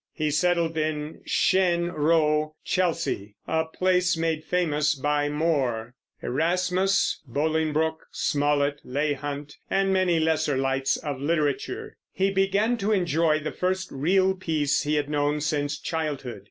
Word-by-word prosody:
He 155 -2 -1
settled 170 +1 +1
in 155 0 -3
Cheyne 175 -2 +2
Row, 155 -1 +1
Chelsea, 165 - -1
a 160 0 +1
place 180 +1 +1
made 160 -1 -1
famous 155 -3 +1
by 145 +1 0
More, 135 -7 0 0.3
Erasmus, 180 +6 +1
Bolingbroke, 160 +3 0
Smollett, 145 -1 0
Leigh 145 +3 -1
Hunt, 145 +1 -6
and 195 0 +2
many 185 -3 +2
lesser 155 -3 +1
lights 135 0 +1
of 145 -4 -5
literature, 150 -2 -1 0.2
and 195 +1 +2
began 200 +5 +2
to 210 0 -1
enjoy 165 -5 +2
the 155 - -3
first 185 +1 -2
real 185 +7 +2
peace 155 -6 0
he 150 +1 0
had 145 -1 0
known 145 0 0
since 145 -1 -1
childhood. 145 -9 -4
155 Hz, 130 wpm, -25 LUFS, 145-175 Hz, 0.3 s, Cheyne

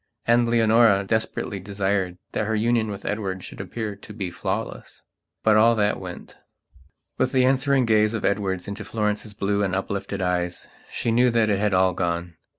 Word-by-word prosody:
And 120 0 +4
Leonora 115 -3 +4
desperately 100 -1 -2
desired 95 -2 -1
that 110 - -1
her 110 - 0
union 115 +1 +1
with 100 -1 -7
Edward 95 -3 -3
should - - -8
appear 110 -3 -5
to 105 +1 -12
be 95 -4 -4
flawless. - - -5 0.4
But 110 -1 +5
all 115 +2 +5
that 105 -1 +1
went.... - - -9 0.8
With 130 - +2
the 130 -1 +4
answering 135 0 +3
gaze 110 0 +3
of 110 - -2
Edward 95 -2 -1
into 100 +2 -5
Florence's 105 -1 -2
blue 100 0 0
and 95 -2 0
uplifted 100 +1 -3
eyes, 90 -1 -2 0.2
she 115 - -1
knew 125 +2 +4
that 115 -2 +2
it 100 - +1
had 105 -2 +1
all 95 0 +3
gone. 85 0 -2
105 Hz, 175 wpm, -24 LUFS, 95-115 Hz, 0.8 s, But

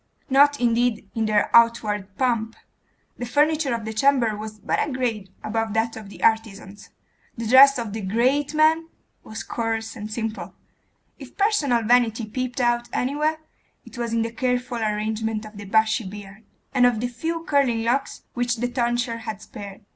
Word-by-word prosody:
Not, 285 +2 +5
indeed, 240 -2 +1
in 220 -1 -1
their 210 -1 +2
outward 210 -4 +3
pomp; 230 -3 0 0.6
the 245 - -3
furniture 300 +2 +2
of 225 -2 -6
the 220 - -4
chamber 240 -2 +2
was 215 0 -7
but - - -1
a 295 - -2
grade 230 -7 -2
above 225 0 -2
that 225 +1 0
of 215 -3 -9
the - - -11
artisan's; 205 -3 -1 0.5
the 230 - -4
dress 270 +4 +7
of 230 -4 -4
the 220 - -4
great 255 +9 +1
man 320 +1 +3 0.3
was 220 - -7
coarse 225 -1 -3
and 215 -2 -7
simple; 225 0 -5 0.6
if - - -12
personal 305 - +2
vanity 235 -1 +2
peeped 255 +3 -4
out 240 -1 +1
anywhere, 300 +4 -1 0.4
it - - -13
was 235 -1 -3
in 230 0 +1
the 230 - -4
careful 250 0 -2
arrangement 215 0 -2
of 215 0 -12
the 205 - -8
bushy 220 +3 +2
beard, 200 +1 -10 0.3
and 250 -2 +5
of 240 -3 0
the 245 - -1
few 325 +7 -4
curling 275 -8 +1
locks 245 +4 -1
which 245 -1 0
the 245 +1 -2
tonsure 240 -1 -1
had 220 -3 -6
spared. 200 -1 -10
230 Hz, 170 wpm, -23 LUFS, 220-255 Hz, 0.6 s, dress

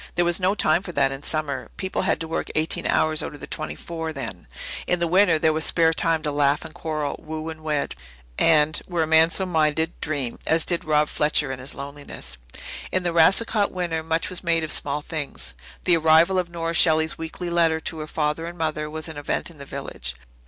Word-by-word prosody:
There 175 -1 +3
was 175 +1 +4
no 190 +2 +2
time 160 -3 +3
for 185 - -7
that 140 -2 +2
in 135 0 -6
summer. 145 -6 -3
People 190 -1 -2
had - - +1
to 165 - -3
work 165 - -3
eighteen 155 +1 0
hours 155 -1 +2
out - - -5
of - - -12
the - - -7
twenty - - -5
four 165 -1 -5
then. - - -6 0.4
In 180 - +3
the 170 - +1
winter 180 -1 +4
there 155 0 +3
was 160 +1 0
spare 165 0 +3
time 165 -1 +1
to 150 - -1
laugh 145 +1 +2
and 160 - -9
quarrel, 155 -3 -3
woo 155 0 -5
and 160 -1 -8
wed 150 -2 -1 0.5
and 155 -1 +4
were 175 -3 0
a - - +1
man 160 +1 +5
so 190 +3 +1
minded 160 -1 +1
dream, 140 -6 -2
as 160 0 +3
did 175 -2 0
Rob 150 -1 +3
Fletcher 150 -2 +1
in 130 - -5
his 130 +2 -4
loneliness. 140 - -8 0.5
In 185 -1 0
a 175 - +1
Racicot 200 +5 +4
winter 170 -3 -2
much 160 +1 -1
was 185 0 -6
made 165 -2 +2
of 155 - -2
small 145 +1 -2
things. 155 -3 -5 0.3
The 175 -2 +5
arrival 165 +4 +5
of 180 -1 -2
Nora 165 -1 -3
Shelley's 160 -1 +3
weekly 170 +2 -5
letter 165 -2 +3
to 160 - -4
her 155 - -5
father 150 +2 -1
and 175 +1 -8
mother 155 -2 -2
was 155 +1 -4
an 160 -2 -8
event 145 - -2
in 155 - -17
the 140 - -8
village. 100 - -4
160 Hz, 225 wpm, -24 LUFS, 150-170 Hz, 0.5 s, man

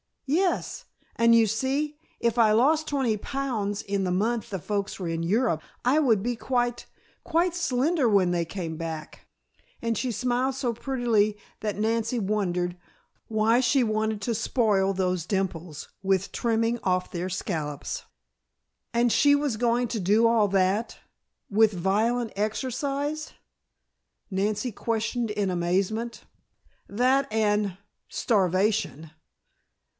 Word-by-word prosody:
"Yes. 350 +7 0 0.3
And 230 0 +5
you 230 -1 +6
see, 270 +7 -1 0.2
if 235 0 +1
I 220 -2 +5
lost 305 +7 +3
twenty 265 -7 0
pounds 220 -5 -2
in 195 -1 -2
the 180 - 0
month 225 +4 0
the 195 - -3
folks 200 +5 -3
are 180 - -3
in 165 0 -2
Europe 190 -1 +1 0.2
I 270 +5 +4
would 225 -10 +3
be 240 0 -1
quite 245 -1 -1 0.4
quite 345 +1 +1
slender 300 -3 +1
when 195 -5 +3
they 170 -1 0
came 165 -2 -5
back," 160 -2 -7 0.5
and 230 -1 0
she 255 - -1
smiled 250 +3 0
so 255 -3 -1
prettily 230 -4 +1 0.2
that 210 -2 -3
Nancy 230 +2 0
wondered 180 -4 -1 0.5
Why 220 +2 +3
she 255 +1 +3
wanted 215 -1 -1
to 235 +3 -1
spoil 210 -4 +1
those 185 -3 -1
dimples 180 -5 -3
with 190 0 0
trimming 230 0 0
off 185 -1 0
their 180 +1 -3
scallops. 155 -6 -4 0.9
"And 235 0 +3
she 285 +4 +5
was 285 -6 -1
going 240 +1 +1
to 230 - -2
do 205 +5 +3
all 230 -2 +4
that 195 +3 +1 0.5
with 215 +1 +4
violent 220 +6 0
exercise?" 275 +7 -2 1.0
Nancy 205 +5 -1
questioned 230 +2 -2
in 205 -2 -1
amazement. 195 +6 -1 0.6
"That 255 +6 +2
and 210 -3 +1 0.3
starvation." 190 - 0
220 Hz, 130 wpm, -26 LUFS, 195-245 Hz, 1.0 s, you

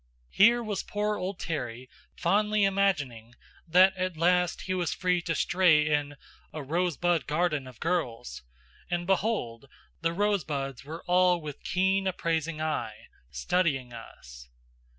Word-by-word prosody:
Here 235 +4 +5
was 210 -3 -3
poor 210 0 -2
old 185 0 -4
Terry 130 -7 -5 0.3
fondly 210 +4 +2
imagining 145 - 0 0.3
that 185 +3 +5
at 185 -2 -3
last 180 +1 +2
he 185 - -2
was 175 -4 -1
free 180 -1 +1
to 165 -1 -2
stray 175 -5 +3
in 145 -1 0 0.4
"a 155 - -6
rosebud 175 +2 0
garden 150 -3 0
of 125 -3 -13
girls" 155 -9 -2 0.5
and 175 -1 -2
behold! 180 - -1 0.4
the 165 0 +1
rosebuds 155 - -1
were 160 +4 -8
all 180 0 +3
with 150 -3 -8
keen 190 +1 +1
appraising 165 -3 -2
eye, 120 -9 -4 0.2
studying 135 - -1
us. - - -12
170 Hz, 130 wpm, -28 LUFS, 145-185 Hz, 0.5 s, Here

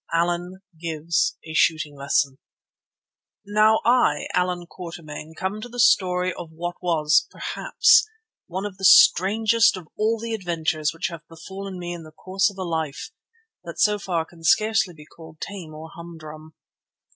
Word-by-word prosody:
ALLAN 175 +2 -1 0.2
GIVES 165 0 -1
A 160 - -8
SHOOTING 155 -2 +1
LESSON 140 -1 0 1.1
Now 215 +2 +3
I, 235 -12 +3
Allan 180 -1 0
Quatermain, 165 -3 -9
come 195 +3 -3
to 245 - -8
the 245 +1 -8
story 180 -4 +3
of 170 -1 -8
what 175 +2 -4
was, 160 -4 +2
perhaps, 460 -2 +3 0.4
one 190 +3 -4
of 200 -2 -6
the 195 - -12
strangest 220 +5 +5
of 175 -4 -10
all 220 +2 +1
the 230 +1 -4
adventures 160 -6 -1
which 165 +3 -3
have 170 -2 -8
befallen 190 +3 -8
me 175 -1 -5
in 170 - -7
the 155 - -12
course 190 +5 0
of 200 - -14
a 190 - -3
life 160 -5 -4 0.5
that - - -9
so 210 -1 +3
far 170 -5 -2
can 165 0 -18
scarcely 215 0 +2
be 150 -1 -14
called 160 0 -15
tame 175 -6 -7
or 160 +1 -10
humdrum. 155 -2 -11
175 Hz, 155 wpm, -23 LUFS, 160-195 Hz, 1.1 s, strangest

